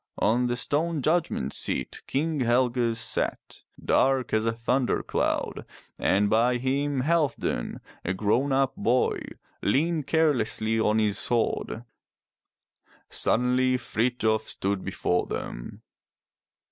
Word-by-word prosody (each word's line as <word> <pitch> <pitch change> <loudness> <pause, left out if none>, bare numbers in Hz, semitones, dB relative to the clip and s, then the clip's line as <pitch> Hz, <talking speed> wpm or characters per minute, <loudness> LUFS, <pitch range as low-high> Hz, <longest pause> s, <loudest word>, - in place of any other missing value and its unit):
On 120 +4 +2
the 120 - 0
stone 150 +4 -1
judgment 155 - 0
seat - - -2
King 155 +2 -1
Helge 120 -1 +2
sat, - - -2 0.2
dark 135 -1 +1
as 110 +1 +2
a - - +3
thunder 120 +3 0
cloud, - - -1 0.4
and 100 +2 +2
by 120 +4 +3
him 135 +2 0
Halfdan, 150 - 0 0.2
a 95 - -1
grown 110 +8 +1
up 135 0 +1
boy, 125 +3 +1 0.4
leaned 155 +6 +1
carelessly 115 -8 +1
on 110 0 +2
his 105 -2 +1
sword. 115 -1 -1 1.3
Suddenly 125 +1 +2
Frithjof 110 -2 0
stood 100 -1 -2
before 90 -2 -1
them. - - -6
125 Hz, 110 wpm, -26 LUFS, 110-135 Hz, 1.3 s, a